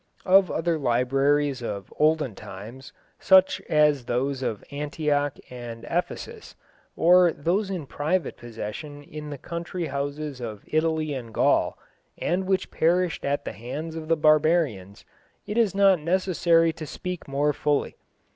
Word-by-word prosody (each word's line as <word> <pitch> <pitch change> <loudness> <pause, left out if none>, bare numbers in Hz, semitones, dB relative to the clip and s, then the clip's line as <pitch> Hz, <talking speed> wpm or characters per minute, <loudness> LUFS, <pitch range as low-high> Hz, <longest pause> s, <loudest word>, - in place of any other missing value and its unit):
Of 190 0 +5
other 165 0 0
libraries 135 +2 +1
of 100 -4 -5
olden 155 -5 +2
times, 105 +7 -10 0.3
such 190 -1 +5
as 150 -4 +3
those 130 +3 -1
of 110 -5 -3
Antioch 145 0 -1
and 120 -2 -8
Ephesus, - - -4 0.4
or 175 0 +5
those 185 +7 -1
in 180 -6 -4
private 160 +6 -1
possession 120 +6 -7
in 150 +1 -8
the 145 - -6
country 170 +4 -5
houses 145 0 -4
of 110 -4 -6
Italy 155 -1 0
and 120 -4 -6
Gaul, - - +2 0.4
and 185 +2 -1
which 190 -1 0
perished 175 +1 +1
at 140 +1 -1
the - - -4
hands 150 +8 -6
of 160 -1 -6
the 165 0 +2
barbarians, 155 - +2 0.4
it 210 - -4
is 225 -5 +2
not 195 -3 +5
necessary 170 -1 +2
to 155 -1 -8
speak 180 +2 -6
more 145 +2 +1
fully. 145 -1 0
150 Hz, 140 wpm, -25 LUFS, 135-170 Hz, 0.4 s, Of